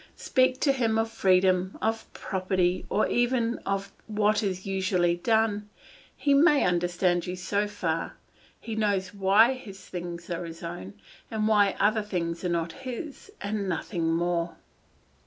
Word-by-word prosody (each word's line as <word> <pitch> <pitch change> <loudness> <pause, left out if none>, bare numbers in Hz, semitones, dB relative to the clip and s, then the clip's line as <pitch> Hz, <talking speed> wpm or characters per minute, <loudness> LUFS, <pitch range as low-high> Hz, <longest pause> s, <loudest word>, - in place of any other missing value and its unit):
Speak 255 0 +2
to 280 - +4
him 230 -5 +1
of 225 0 0
freedom, 185 -2 +2
of 225 0 -2
property, 185 -1 -1
or 210 - +2
even 240 -1 +1
of 195 0 -2 0.2
what 215 0 +2
is 190 -3 -3
usually 190 -3 +1
done; 210 +1 +1 0.5
he 285 - +2
may 295 0 +5
understand 175 0 +1
you 180 - -3
so 200 +3 -1
far; 170 -6 -2 0.4
he 225 - -6
knows 200 -3 0
why 205 +5 +5
his 200 -8 -11
things 175 -1 -6
are 170 0 -2
his 165 0 -9
own, 100 - -7 0.3
and 215 -1 0
why 205 -2 +4
other 215 +2 +3
things 175 -5 -3
are 180 - 0
not 170 -1 -1
his, 275 - -7
and 200 -1 -2
nothing 170 -1 -1
more. 170 0 0
195 Hz, 150 wpm, -27 LUFS, 175-220 Hz, 0.5 s, may